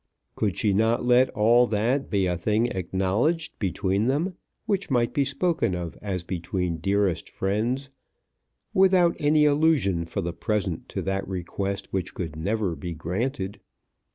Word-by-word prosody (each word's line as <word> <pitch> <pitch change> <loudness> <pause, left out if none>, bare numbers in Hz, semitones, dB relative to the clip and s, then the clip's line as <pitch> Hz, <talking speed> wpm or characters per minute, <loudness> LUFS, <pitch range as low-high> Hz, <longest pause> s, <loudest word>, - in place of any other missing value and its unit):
Could 100 -4 -1
she 105 -2 +2
not 110 +4 +2
let 125 +1 +5
all 120 +3 +4
that 120 +6 0
be 100 -3 +1
a 90 -1 0
thing 105 +6 +1
acknowledged 95 - -1
between 100 +2 0
them, 155 +8 0 0.3
which 200 -1 -1
might 120 -3 +1
be 140 - +2
spoken 140 - 0
of 85 -2 -5
as 95 -4 -3
between 90 -1 -2
dearest 100 -1 0
friends, 120 +8 -1 0.8
without 185 -2 +4
any 150 +1 +4
allusion 145 - +2
for 85 - -3
the 85 0 -3
present 95 0 -2
to - - -4
that 95 0 -2
request 95 +2 -4
which 95 -2 -2
could 80 -4 -4
never 100 +2 -1
be 85 -1 -6
granted? 95 - -3
105 Hz, 150 wpm, -25 LUFS, 95-130 Hz, 0.8 s, let